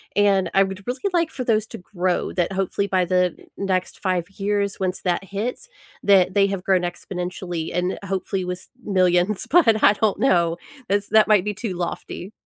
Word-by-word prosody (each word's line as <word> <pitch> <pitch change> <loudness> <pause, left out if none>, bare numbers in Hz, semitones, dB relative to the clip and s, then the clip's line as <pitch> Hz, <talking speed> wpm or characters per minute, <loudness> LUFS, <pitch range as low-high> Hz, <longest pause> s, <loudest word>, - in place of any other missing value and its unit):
And 200 -2 +3
I 195 - +6
would 190 +1 -5
really 255 +1 -4
like 335 -2 +2
for 260 -5 -5
those 220 -2 +1
to - - -8
grow, 180 0 -2
that 175 0 0
hopefully 195 +1 -1
by 185 -2 +1
the 180 0 +1 0.2
next 185 -2 -2
5 180 -3 -1
years 200 0 -1
once 185 -1 -2
that 180 +1 0
hits, 220 - -4 0.3
that 190 -2 +4
they 200 0 +4
have 195 -2 -4
grown 190 -2 +3
exponentially 175 -1 -4
and 180 +1 -1
hopefully 190 0 -2
with 180 0 -6
millions. 185 0 +2
But 230 -11 +4
I 205 - +7
don't 210 -1 0
know. 170 -9 +2 0.3
That's 205 +1 0
that 220 -1 +5
might 210 -3 +4
be 210 - -1
too 195 -1 -4
lofty. 180 +2 -5
190 Hz, 185 wpm, -22 LUFS, 180-205 Hz, 0.3 s, I